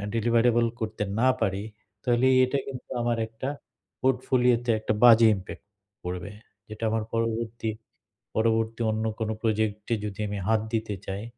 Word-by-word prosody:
Deliverable 115 +1 +3
করতে 110 -1 -3 0.2
না 130 - +4
পারি 95 +1 0 0.4
তাহলে 120 +1 +3 0.2
এটা 130 +2 -1
কিন্তু 130 -2 -8
আমার 120 0 0
একটা 110 +3 -6 0.5
পোর্টফোলিও 125 -1 +3
তে 120 - +3
একটা 110 0 -1
বাজে 115 -1 +8
ইমপ্যাক্ট 95 +1 -9 0.4
পড়বে। 90 +3 -5 0.4
যেটা 110 +1 -8
আমার 110 -1 0
পরবর্তী 115 0 -1 0.7
পরবর্তী 115 +1 +1
অন্য 110 +1 -2 0.2
কোনো 110 0 -1
প্রজেক্ট 110 -2 0
এ - - +4
যদি 100 -1 -6
আমি 100 0 -4
হাত 110 -1 +3
দিতে 110 -2 -1
চাই, 95 +2 -4
110 Hz, 150 wpm, -26 LUFS, 110-120 Hz, 0.7 s, বাজে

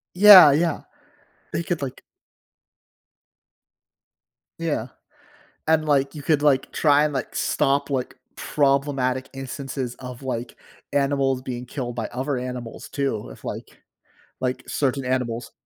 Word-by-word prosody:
Yeah, 190 -6 +10
yeah. 165 +1 +1 0.7
They 170 - -1
could 170 -3 -3
like 130 - -5 2.6
Yeah, 145 -8 -2 0.8
and, 155 -1 +2
like, 140 -2 +1
you 150 - -7
could, 150 0 +1
like, 135 -3 +2
try, 145 -1 +4
and, 150 - -1
like, 130 -4 -4
stop, 140 +1 +1
like, 130 -2 -2 0.2
problematic 135 -2 0
instances 135 -1 -5
of, 125 0 -9
like, 125 -2 -4 0.4
animals 140 -2 +1
being 125 -2 -5
killed 120 -2 -5
by 115 -2 -3
other 130 +3 -3
animals 125 -2 -6
too, 135 -7 -3
if, - - -14
like - - -7 0.6
like, 125 0 -2
certain 135 -1 -1
animals. 125 -2 -2
135 Hz, 125 wpm, -23 LUFS, 125-145 Hz, 2.6 s, Yeah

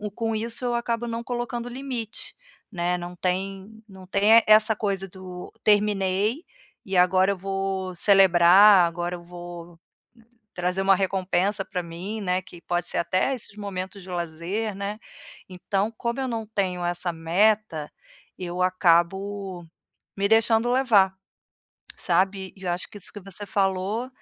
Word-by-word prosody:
com 225 -1 -1
isso, 230 +3 -2
eu 240 -1 0
acabo 235 0 -2
não 230 0 -4
colocando 240 0 -4
limite, 245 -3 -5 0.4
né. 180 -2 -1
Não 175 0 -7
tem 195 +4 -3
não 190 -1 -13
tem 210 +4 +5
essa 215 +1 +6
coisa 195 -2 -2
do 180 -1 -9
"terminei 205 - +2 0.4
e 195 -1 -1
agora 185 +2 +4
eu 200 - -3
vou 195 -1 -3
celebrar, 190 0 +6
agora 175 +1 -3
eu 175 - -11
vou 175 -1 -10 0.8
trazer 180 +2 -1
uma 195 0 +5
recompensa 190 +1 0
pra 180 -2 -4
mim", 175 +6 -6
né, 185 -1 0
que 175 -2 -14
pode 175 0 -2
ser - - -3
até 185 +10 +1
esses 215 -4 -7
momentos 195 -1 -5
de 185 - -12
lazer, 175 +5 -3
né. 200 +2 -4 0.5
Então, 195 +3 -2
como 235 +2 -2
eu 265 - -1
não 225 -3 -4
tenho 185 -4 -2
essa 175 0 -2
meta, 170 -1 +1 0.5
eu 180 0 -4
acabo 185 +1 +1 0.5
me 200 0 +1
deixando 225 +1 +3
levar, 225 -7 +4 0.8
sabe. 190 +2 0
E 195 - -16
eu 180 - -1
acho 175 +1 -3
que - - -14
isso 190 - -10
que 205 - -9
você 195 +1 -8
falou 195 +5 -1
195 Hz, 150 wpm, -25 LUFS, 180-215 Hz, 0.8 s, essa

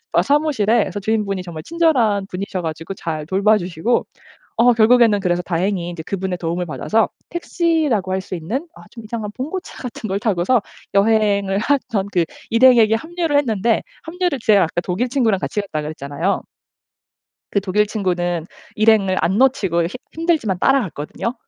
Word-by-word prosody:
아 - - +4
사무실에. 280 -7 +2
그레서 195 +2 -5
주인분이 200 -2 -1
정말 165 -3 -8
친절한 255 - +2
분이셔 185 -1 -4
가지고 165 +3 -5
잘 155 -5 -4
돌봐 200 +5 +3
주시고 180 +6 -1 0.5
어 240 +2 +5
결국에는 225 -2 +5
그래서 175 -2 0
다행히 175 0 -1
이제 170 -2 -7
그분의 190 -2 -3
도움을 175 +1 -2
받아서 220 +7 0 0.2
택시라고 320 - 0
할 190 - 0
수 185 - -7
있는 230 - -4
아 - - -13
좀 230 -3 -11
이상한 215 -1 -4
봉고차 315 +9 -5
같은 235 -3 -6
걸 195 +1 -1
타고서 210 +3 +2 0.3
여행을 200 -2 +2
하던 230 -7 0
그 175 -2 +2 0.3
일행에게 230 -2 +6
합류를 325 +2 -2
했는데 230 -4 +1 0.2
합류를 345 -4 -2
제가 205 -5 +5
아까 170 +1 -2
독일 190 +8 -1
친구랑 235 -6 +1
같이 210 - -2
갔다 160 -7 -4
그랬잖아요. 150 +4 -2 1.1
그 200 - +1
독일 210 +2 +1
친구는 175 -5 -1 0.3
일행을 210 -3 +3
안 190 +4 +1
놓치고 205 -11 +2
힘 170 - -3 0.2
힘들지만 320 - 0
따라갔거든요. 230 - 0
205 Hz, 375 characters per minute, -20 LUFS, 180-245 Hz, 1.1 s, 일행에게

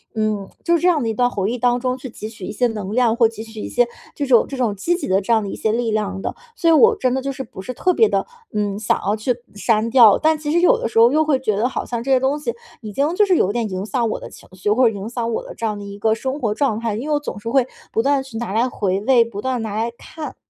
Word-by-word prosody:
嗯， 215 -2 -1 0.2
就 340 0 +3
这 350 +2 +1
样 315 -6 +3
的 225 - -1
一 - - -1
段 245 +3 +2
回 200 -1 -1
忆 245 - -2
当 245 0 +2
中 255 0 -1
去 260 0 -8
汲 215 -1 -7
取 205 -4 -9
一 - - -5
些 245 +4 0
能 210 -3 -5
量， 245 -2 +3
或 235 -2 +5
汲 220 0 -8
取 220 -1 -10
一 - - -4
些 245 0 +2 0.3
这 285 - -2
种 245 -4 +5
这 275 - -6
种 240 -5 0
积 335 - 0
极 350 - -4
的 190 +1 +3
这 215 +4 +1
样 220 -2 +3
的 200 - -4
一 - - -5
些 220 - 0
力 235 -1 0
量 200 -3 -2
的。 - - -3 0.2
所 335 - +2
以 330 - +6
我 455 +8 +6
真 255 -12 0
的 265 - -1
就 275 +1 -3
是 265 0 -6
不 190 -5 -10
是 255 +6 -6
特 365 +8 +1
别 445 - +4
的， - - 0 0.3
嗯， 205 -1 -1
想 - - +1
要 205 - +1
去 220 +4 0 0.2
删 220 +1 +1
掉。 230 -4 +7
但 315 0 +3
其 295 -1 -5
实 345 +2 +3
有 360 - +5
的 - - -2
时 225 - -5
候 235 +2 +7
又 310 +1 +3
会 295 -3 +2
觉 215 -6 0
得 230 +4 +2
好 - - -4
像 235 -2 -3
这 270 - -5
些 260 - +5
东 270 +3 0
西 380 +11 -3 0.3
已 215 - -7
经 290 +7 +1
就 420 - +4
是 375 -3 +3
有 195 - +2
点 225 -1 -2
影 185 +1 -4
响 235 0 0
我 - - -3
的 - - -9
情 - - -15
绪， 185 +2 -3
或 240 +2 +4
者 220 - -6
影 200 +2 -5
响 235 -1 -3
我 - - -2
的 - - -9
这 230 - -4
样 210 -2 -1
的 205 - -8
一 200 0 -8
个 220 +2 +2
生 265 +5 -4
活 220 -6 0
状 225 -2 0
态， 230 -3 -2
因 240 +7 -5
为 300 - +2
我 - - +1
总 290 -8 -6
是 230 +3 -5
会 260 0 +2 0.2
不 225 - +1
断 280 +2 +2
去 245 -4 -9
拿 235 -4 -4
来 230 +4 +2
回 195 -5 -1
味， 240 +1 +5
不 210 -3 -7
断 255 -1 -1
拿 215 -2 -4
来 225 +2 -1
看。 315 -2 -8
235 Hz, 345 characters per minute, -20 LUFS, 215-265 Hz, 0.3 s, 掉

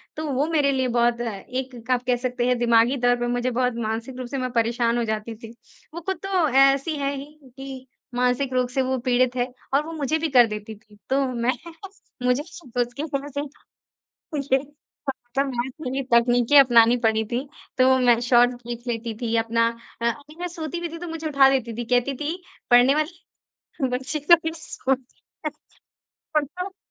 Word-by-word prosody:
तो 315 - -4
वो 275 +4 +1
मेरे 295 -4 +2
लिए 260 -1 0
बहुत 240 0 +2
अ, - - -2
एक 250 +3 -6
आप 250 -1 +2
कह 250 - +3
सकते 245 -1 -1
हैं 250 -1 +2
दिमागी 235 +2 +4
तौर 245 -1 +3
पर 240 - -1
मुझे 245 +1 0
बहुत 250 0 +1
मानसिक 230 +4 -4
रूप 255 -1 -5
से 275 - -2
मैं 255 -1 -2
परेशान 235 0 +1
हो 240 - +1
जाती 220 +1 -3
थी। 225 +1 -11 0.4
वो 340 - -6
खुद 380 +3 -3
तो 370 -4 +2
ऐसी 275 +3 +4
है 280 0 -1
ही, 275 0 -6 0.3
कि 265 -1 -8 0.3
मानसिक 250 +2 +1
रोग 250 -1 +1
से 265 +1 0
वो 260 0 0
पीड़ित 250 0 +3
है, 250 0 -1 0.2
और 290 +2 +3
वो 330 - -6
मुझे 310 0 0
भी 325 - -1
कर 245 -4 +6
देती 210 0 -6
थी। 210 0 -21
तो 270 +1 +2
मैं 240 +1 0 0.7
मुझे 250 +2 +2
उसके 310 -7 -8
वज़ह 275 +4 -2
से 285 0 -4
ही 290 0 -12 0.8
ये 265 - +6 0.5
खतरनाक 260 0 -2
वाली 265 -1 -2
तकनीके 240 +3 +4
अपनानी 240 -3 +7
पड़ी 220 0 +3
थी। 250 +4 -2 0.3
तो 260 0 +5
मैं 240 -2 +4
शॉर्ट्स 245 0 +4
देख 240 0 -5
लेती 230 -1 -3
थी 230 -1 -1
अपना 230 0 +2 0.3
अ, 235 0 +3
कभी 290 +4 -13
मैं 355 - -2
सोती 335 -1 -5
भी 345 - -2
थी 330 - -7
तो 350 - -7
मुझे 325 -1 -4
उठा 275 -3 +5
देती 255 -4 0
थी। 240 - -3
कहती 245 +3 +1
थी, 310 +7 -4 0.3
पढ़ने 245 +3 +6
वाले 320 +3 -3 0.7
बच्चे 275 +4 -4
कभी 325 -1 +6
सोते 265 -5 -3 0.3
नहीं - - -3 0.9
खुद 290 - -5
तो 380 +1 -7
255 Hz, 190 wpm, -24 LUFS, 240-280 Hz, 0.9 s, अपनानी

